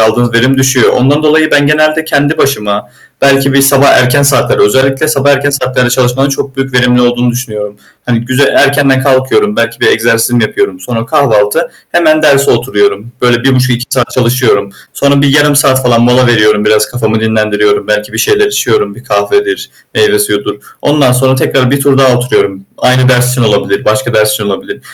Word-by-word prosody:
aldığınız 120 Hz, +2 st, +1 dB
verim 130 Hz, +3 st, +2 dB
düşüyor. 130 Hz, -2 st, +2 dB
Ondan 145 Hz, +4 st, +1 dB
dolayı 155 Hz, 0 st, +2 dB
ben 145 Hz, -1 st, +2 dB
genelde 155 Hz, +1 st, +1 dB
kendi 150 Hz, -1 st, -1 dB
başıma 105 Hz, -6 st, -2 dB, 0.3 s
belki 140 Hz, 0 st, +2 dB
bir 140 Hz, -, +3 dB
sabah 140 Hz, 0 st, +3 dB
erken 130 Hz, +3 st, +3 dB
saatlerde, 140 Hz, -1 st, +1 dB
özellikle 135 Hz, +7 st, +1 dB
sabah 145 Hz, -2 st, +1 dB
erken 140 Hz, 0 st, +1 dB
saatlerde 125 Hz, -2 st, -1 dB
çalışmanın 130 Hz, +2 st, 0 dB
çok 135 Hz, 0 st, -5 dB
büyük 135 Hz, 0 st, -4 dB
verimli 125 Hz, 0 st, +2 dB
olduğunu 120 Hz, 0 st, 0 dB
düşünüyorum. 105 Hz, -4 st, -6 dB, 0.3 s
Hani, 120 Hz, -2 st, -1 dB
güzel 130 Hz, +4 st, 0 dB
erkenden 135 Hz, -1 st, +2 dB
kalkıyorum, 135 Hz, +11 st, 0 dB
belki 115 Hz, 0 st, -2 dB
bir -, -, +1 dB
egzersizimi 115 Hz, +1 st, +1 dB
yapıyorum. 95 Hz, -3 st, -2 dB
Sonra 115 Hz, +4 st, -5 dB
kahvaltı, 130 Hz, -1 st, 0 dB, 0.2 s
hemen 155 Hz, -2 st, +2 dB
derse 140 Hz, -2 st, +3 dB
oturuyorum. 125 Hz, -, -1 dB
Böyle 120 Hz, 0 st, +1 dB
1,5-2 130 Hz, -2 st, 0 dB
saat 130 Hz, -3 st, -1 dB
çalışıyorum. 125 Hz, -5 st, 0 dB, 0.2 s
Sonra 140 Hz, 0 st, +1 dB
bir 145 Hz, -, +2 dB
0,5 145 Hz, -1 st, +2 dB
saat 135 Hz, -3 st, +2 dB
falan 120 Hz, -2 st, +1 dB
mola 125 Hz, +1 st, +2 dB
veriyorum 105 Hz, -3 st, +2 dB
biraz, 105 Hz, 0 st, +1 dB
kafamı 110 Hz, -3 st, -2 dB
dinlendiriyorum. 105 Hz, -2 st, -1 dB
Belki 105 Hz, 0 st, -3 dB
bir -, -, -6 dB
şeyler 420 Hz, -1 st, +1 dB
içiyorum 425 Hz, +1 st, -1 dB
bir -, -, -15 dB
kahvedir, 405 Hz, 0 st, -2 dB, 0.2 s
meyve 425 Hz, -2 st, +2 dB
suyudur. 415 Hz, -1 st, -2 dB, 0.3 s
Ondan 145 Hz, -4 st, +1 dB
sonra 130 Hz, +1 st, +1 dB
tekrar 130 Hz, -1 st, 0 dB
1 140 Hz, +1 st, 0 dB
tur 135 Hz, -1 st, +1 dB
daha 130 Hz, -2 st, +3 dB
oturuyorum. 100 Hz, -6 st, -2 dB, 0.2 s
Aynı 130 Hz, 0 st, +2 dB
ders 125 Hz, -1 st, +2 dB
için 125 Hz, -1 st, -1 dB
olabilir. 105 Hz, -3 st, -1 dB
Başka 110 Hz, +2 st, -1 dB
ders 105 Hz, 0 st, +2 dB
için 105 Hz, 0 st, -3 dB
olabilir. 100 Hz, -1 st, -6 dB
130 Hz, 180 wpm, -9 LUFS, 115-140 Hz, 0.3 s, bir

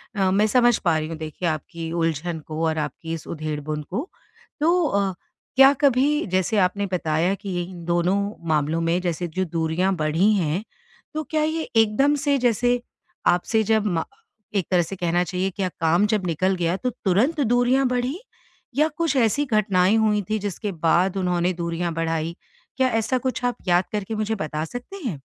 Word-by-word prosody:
अ, 190 Hz, -2 st, +2 dB
मैं 205 Hz, +3 st, +3 dB
समझ 240 Hz, 0 st, +4 dB
पा 170 Hz, -4 st, +1 dB
रहीं 155 Hz, 0 st, -3 dB
हूँ 165 Hz, -, -5 dB
देखिए 155 Hz, +3 st, -4 dB
आपकी 165 Hz, +1 st, -5 dB
उलझन 165 Hz, 0 st, -1 dB
को 155 Hz, +1 st, -3 dB
और 160 Hz, -1 st, 0 dB
आपकी 155 Hz, +2 st, -4 dB
इस 165 Hz, -, -6 dB
उधेड़-बुन 150 Hz, -1 st, -4 dB
को। 250 Hz, -, -3 dB, 0.5 s
तो 340 Hz, +3 st, +3 dB
अ, 200 Hz, -5 st, 0 dB, 0.4 s
क्या 270 Hz, +1 st, +8 dB
कभी 285 Hz, +2 st, +3 dB
जैसे 185 Hz, +3 st, 0 dB
आपने 200 Hz, +2 st, +1 dB
बताया 170 Hz, 0 st, +1 dB
कि 200 Hz, 0 st, -8 dB
ये 175 Hz, -1 st, -1 dB
इन 175 Hz, -1 st, -9 dB
दोनों 175 Hz, +2 st, +2 dB, 0.3 s
मामलों 155 Hz, +1 st, +1 dB
में 165 Hz, +2 st, +1 dB
जैसे 175 Hz, -1 st, -2 dB
जो 185 Hz, +3 st, -2 dB
दूरियाँ 165 Hz, +3 st, 0 dB
बढ़ी 165 Hz, +5 st, +2 dB
हैं, 180 Hz, -1 st, 0 dB, 0.5 s
तो 310 Hz, 0 st, -2 dB
क्या 310 Hz, 0 st, -1 dB
ये 315 Hz, +1 st, 0 dB
एकदम 225 Hz, +7 st, +4 dB
से 285 Hz, -1 st, +3 dB
जैसे 245 Hz, 0 st, +2 dB, 0.5 s
आपसे 180 Hz, +5 st, +2 dB
जब 220 Hz, 0 st, +2 dB
मा 170 Hz, -5 st, 0 dB, 0.5 s
एक 190 Hz, -4 st, 0 dB
तरह 180 Hz, -1 st, +4 dB
से 175 Hz, +3 st, -5 dB
कहना 175 Hz, -1 st, +1 dB
चाहिए 185 Hz, +1 st, -2 dB
क्या 195 Hz, -2 st, -1 dB
काम 165 Hz, +5 st, +3 dB
जब 210 Hz, -3 st, 0 dB
निकल 185 Hz, +4 st, +1 dB
गया 175 Hz, -1 st, 0 dB
तो 250 Hz, -, -1 dB, 0.2 s
तुरंत 235 Hz, -, +2 dB
दूरियाँ 245 Hz, +2 st, +3 dB
बढ़ीं? 250 Hz, +4 st, -1 dB, 0.6 s
या 300 Hz, +3 st, +4 dB
कुछ 330 Hz, -4 st, 0 dB
ऐसी 250 Hz, +4 st, +2 dB
घटनाएँ 205 Hz, -5 st, +3 dB
हुईं 210 Hz, -2 st, +2 dB
थी 215 Hz, 0 st, 0 dB
जिसके 205 Hz, +1 st, -4 dB
बाद 180 Hz, +4 st, +3 dB
उन्होंने 180 Hz, -1 st, +1 dB
दूरियाँ 170 Hz, 0 st, -2 dB
बढ़ाई? 165 Hz, 0 st, -2 dB, 0.4 s
क्या 260 Hz, -1 st, +3 dB
ऐसा 225 Hz, +2 st, 0 dB
कुछ 255 Hz, 0 st, -3 dB
आप 245 Hz, -, 0 dB
याद 175 Hz, 0 st, +4 dB
करके 210 Hz, +1 st, -3 dB
मुझे 215 Hz, +1 st, -1 dB
बता 155 Hz, -4 st, -3 dB
सकतें 245 Hz, -, -8 dB
हैं? 165 Hz, -, -3 dB
185 Hz, 180 wpm, -23 LUFS, 165-225 Hz, 0.6 s, क्या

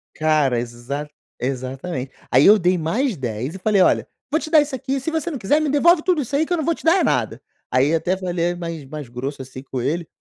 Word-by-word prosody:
Cara, 155 Hz, -5 st, +2 dB
exa 120 Hz, +5 st, -5 dB, 0.3 s
exatamente. 130 Hz, +2 st, -4 dB, 0.2 s
Aí 130 Hz, +3 st, +5 dB
eu 210 Hz, +2 st, +8 dB
dei 180 Hz, -1 st, +2 dB
mais 210 Hz, -, -1 dB
10 125 Hz, -, -4 dB
e -, -, -7 dB
falei: 200 Hz, -1 st, +2 dB
"Olha, -, -, +3 dB, 0.2 s
vou 315 Hz, -, +2 dB
te 310 Hz, -, -6 dB
dar 315 Hz, -2 st, +6 dB
isso 290 Hz, -1 st, -4 dB
aqui, 265 Hz, +1 st, -2 dB
se 325 Hz, -, -3 dB
você 320 Hz, +1 st, -1 dB
não 290 Hz, -, -4 dB
quiser 270 Hz, +9 st, +2 dB
me 310 Hz, -, 0 dB
devolve 320 Hz, +4 st, +4 dB
tudo 350 Hz, -4 st, +1 dB
isso 270 Hz, +2 st, -7 dB
aí 315 Hz, -, +2 dB
que 355 Hz, -, -2 dB
eu -, -, +1 dB
não 315 Hz, -, -1 dB
vou 335 Hz, -, +1 dB
te -, -, -12 dB
dar 330 Hz, +3 st, +6 dB
é -, -, +2 dB
nada". -, -, 0 dB, 0.3 s
Aí 135 Hz, +5 st, +2 dB
até 175 Hz, +3 st, +1 dB
falei 175 Hz, -2 st, -2 dB
é -, -, -5 dB
mais 165 Hz, -4 st, -6 dB
mais 145 Hz, -3 st, -8 dB
grosso, 135 Hz, +3 st, -5 dB
assim, 130 Hz, 0 st, -9 dB
com 130 Hz, -2 st, -5 dB
ele. 160 Hz, +6 st, -2 dB
170 Hz, 255 wpm, -21 LUFS, -, 0.3 s, eu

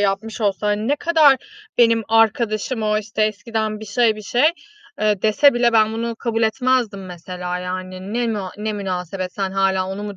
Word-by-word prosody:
yapmış 205 Hz, +3 st, -1 dB
olsa, 205 Hz, -1 st, 0 dB
hani, 210 Hz, +2 st, 0 dB
ne 290 Hz, -, +2 dB
kadar 310 Hz, -4 st, +5 dB, 0.4 s
benim 230 Hz, -1 st, +4 dB
arkadaşım 225 Hz, +1 st, +1 dB
o 215 Hz, 0 st, +1 dB
işte 215 Hz, 0 st, -3 dB
eskiden 215 Hz, 0 st, -2 dB
bir -, -, -7 dB
şey 220 Hz, +1 st, +2 dB
bir 215 Hz, -, -9 dB
şey, 240 Hz, +5 st, 0 dB, 0.6 s
eee, 210 Hz, -2 st, +1 dB
dese 230 Hz, +6 st, +4 dB
bile 240 Hz, 0 st, +2 dB
ben 220 Hz, -1 st, +4 dB
bunu 230 Hz, +1 st, -3 dB
kabul 230 Hz, -1 st, -2 dB
etmezdim 225 Hz, -4 st, 0 dB
mesela, 180 Hz, 0 st, -6 dB
yani. 185 Hz, +2 st, -6 dB
Ne 235 Hz, -1 st, 0 dB
na 195 Hz, -3 st, -4 dB
ne 215 Hz, +1 st, -2 dB
münasebet? 185 Hz, -2 st, -4 dB
Sen 195 Hz, -2 st, -2 dB
hâlâ 190 Hz, -1 st, +1 dB
onu 195 Hz, +2 st, -5 dB
mu 205 Hz, -1 st, -6 dB
215 Hz, 185 wpm, -20 LUFS, 195-230 Hz, 0.6 s, kadar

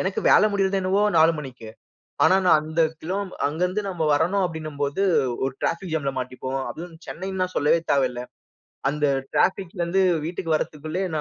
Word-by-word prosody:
எனக்கு 190 Hz, +1 st, -1 dB
வேல -, -, +6 dB
முடியறதென்னவோ 195 Hz, 0 st, +1 dB
4 160 Hz, +1 st, +6 dB
மணிக்கு. 130 Hz, -6 st, -8 dB, 0.6 s
ஆனா 185 Hz, +4 st, +6 dB
நான் 160 Hz, -3 st, +6 dB
அந்த 160 Hz, +2 st, -2 dB, 0.2 s
கிலோ 180 Hz, +4 st, -3 dB, 0.3 s
அங்க 150 Hz, +3 st, -3 dB
இருந்து 195 Hz, +4 st, -2 dB
நம்ம 180 Hz, -4 st, -3 dB
வரணும் 180 Hz, +6 st, +1 dB
அப்டின்னும் 155 Hz, -4 st, -5 dB
போது 145 Hz, +7 st, 0 dB, 0.4 s
ஒரு 135 Hz, 0 st, -2 dB
டிராஃபிக் 170 Hz, 0 st, -2 dB
ஜாம்ல 140 Hz, -3 st, -1 dB
மாட்டிப்போம். 130 Hz, +1 st, -4 dB
அதுவும் 170 Hz, 0 st, -8 dB
சென்னைனா 190 Hz, 0 st, -3 dB
சொல்லவே 150 Hz, +3 st, +3 dB
தேவையில்ல. 125 Hz, -3 st, +1 dB, 0.7 s
அந்த 150 Hz, +1 st, -3 dB, 0.3 s
டிராபிக்லந்து 185 Hz, -1 st, 0 dB, 0.3 s
வீட்டுக்கு 165 Hz, -1 st, -2 dB
வற்ரதுக்குள்ளயே 155 Hz, +5 st, -3 dB
165 Hz, 145 wpm, -24 LUFS, 145-185 Hz, 0.7 s, வேல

